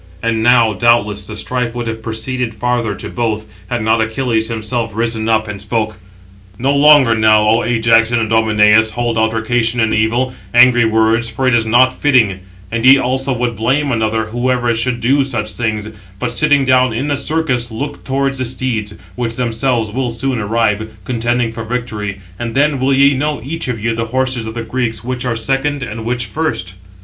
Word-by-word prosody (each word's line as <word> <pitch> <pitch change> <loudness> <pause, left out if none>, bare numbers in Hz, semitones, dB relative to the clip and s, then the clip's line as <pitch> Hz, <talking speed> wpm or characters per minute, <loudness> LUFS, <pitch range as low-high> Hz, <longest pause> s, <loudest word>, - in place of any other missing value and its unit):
And 115 -1 0
now 115 -2 +4
doubtless 105 -1 +1
the 110 - -7
strife 120 +2 -2
would 120 -1 -3
have 110 -1 -5
proceeded 115 +1 -4
farther 120 -2 -1
to - - -8
both, 110 -3 -2 0.2
had 120 -2 -2
not 110 +1 +2
Achilles 110 0 0
himself 115 0 -3
risen 115 -1 -1
up, 110 -1 +1
and 100 -1 -6
spoke: 110 -1 -2 0.6
"No 135 +5 0
longer 145 -4 +6
now, 110 -1 +4
O 115 +2 +3
Ajax 115 -1 +3
and 120 0 +1
Idomeneus, 110 -1 +3
hold 120 0 -1
altercation 115 +1 0
in 110 -1 +1
evil, 120 +4 0 0.2
angry 120 -1 +6
words, 110 +1 +2
for 130 +4 -2
it 130 - +3
is 115 -1 +2
not 125 +3 +4
fitting, 120 -11 +2 0.3
and 115 0 -2
ye 135 +2 +8
also 130 +1 -1
would 120 -2 -1
blame 135 +7 0
another, 110 -1 0
whoever 120 +1 0
should 120 +1 -2
do 135 +4 +3
such 110 -5 -3
things; 110 -3 -2 0.3
but, 120 +3 -3
sitting 145 +1 +2
down 130 -2 +3
in 135 +6 -2
the 145 - 0
circus, 140 -5 -1
look 140 +6 -6
towards 135 0 -1
the 130 - -1
steeds, 115 -4 -2 0.2
which 115 -2 -3
themselves 115 -2 -1
will 125 +2 -2
soon 120 +2 -2
arrive, 110 0 -1
contending 120 -1 -1
for 115 0 -6
victory; 110 -4 -4 0.2
and 120 0 -4
then 145 0 +2
will 130 +2 +1
ye 140 +1 +4
know, 145 +1 -2
each 165 +4 -4
of 120 -3 -3
you, 115 +2 -1
the 115 0 -2
horses 130 -1 -1
of 110 - -7
the 115 - -4
Greeks, 115 -1 -3
which 125 +1 -4
are 120 -2 -1
second, 135 +4 -1
and 115 -2 -6
which 120 0 -2
first." 120 - -3
115 Hz, 190 wpm, -16 LUFS, 110-130 Hz, 0.6 s, ye